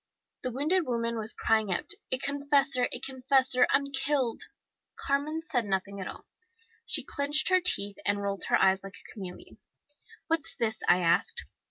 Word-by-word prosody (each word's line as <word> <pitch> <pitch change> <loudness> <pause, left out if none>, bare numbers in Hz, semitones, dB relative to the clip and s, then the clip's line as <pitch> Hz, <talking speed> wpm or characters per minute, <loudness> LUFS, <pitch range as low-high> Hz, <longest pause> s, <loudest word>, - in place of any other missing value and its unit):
The 255 - -2
wounded 305 +7 +1
woman 235 -1 -1
was 220 +1 -1
crying 220 -3 +1
out, 175 - -2 0.2
'A 255 - +1
confessor, 280 -2 +1
a - - -4
confessor! 260 -1 +2
I'm 280 0 +1
killed!' 270 -3 0 0.5
Carmen 295 +3 -1
said 255 -8 0
nothing 195 0 -2
at 185 - -4
all. - - -9 0.6
She - - -1
clinched 285 +4 +1
her 370 0 +4
teeth 205 - +1
and 205 0 +1
rolled 200 -1 -2
her - - +3
eyes 190 0 +3
like 195 0 -9
a - - -13
chameleon. 185 -4 -9 0.7
'What's 325 0 -1
this?' 220 -1 -1
I 180 - +5
asked. 460 - +1
255 Hz, 165 wpm, -29 LUFS, 205-285 Hz, 0.7 s, I